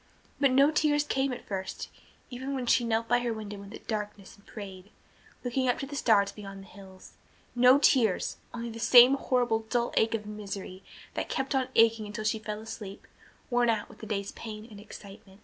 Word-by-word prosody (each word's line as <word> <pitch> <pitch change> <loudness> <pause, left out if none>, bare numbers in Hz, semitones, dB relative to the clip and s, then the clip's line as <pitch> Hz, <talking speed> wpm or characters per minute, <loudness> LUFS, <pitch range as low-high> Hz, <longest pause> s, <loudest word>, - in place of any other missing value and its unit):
But 275 - +4
no 275 +3 +5
tears 295 -1 +2
came 270 -2 0
at 250 - -7
first, 190 -2 -5 0.4
even 260 +3 -4
when 255 -2 -3
she 240 0 +3
knelt 225 0 0
by 245 +1 +3
her 240 -1 -2
window 210 -2 -6
in 200 - -11
the 215 - -8
darkness 210 -2 -6
and 205 - -23
prayed, 195 -3 -9 0.5
looking 255 +1 0
up 245 - +2
to - - -4
the 285 +1 -8
stars 210 -7 +3
beyond 195 -2 -10
the - - -16
hills 190 -1 -14 0.4
no 250 +2 +6
tears, 235 -8 +2
only 235 0 -5
the 230 - -8
same 245 +3 +8
horrible 245 -4 +1
dull 240 -1 0
ache 225 +1 +2
of 210 -2 -5
misery 200 -3 -7 0.3
that - - -3
kept 265 +2 -2
on 265 -2 +1
aching 225 -1 +4
until 215 +1 -5
she 215 0 +1
fell 215 0 -5
asleep, 215 -3 -8 0.5
worn 240 -1 +3
out 225 -2 0
with - - -15
the 220 - -8
day's 200 -2 -3
pain 215 -1 -8
and 205 - -11
excitement. 200 -1 -13
225 Hz, 200 wpm, -29 LUFS, 205-245 Hz, 0.5 s, same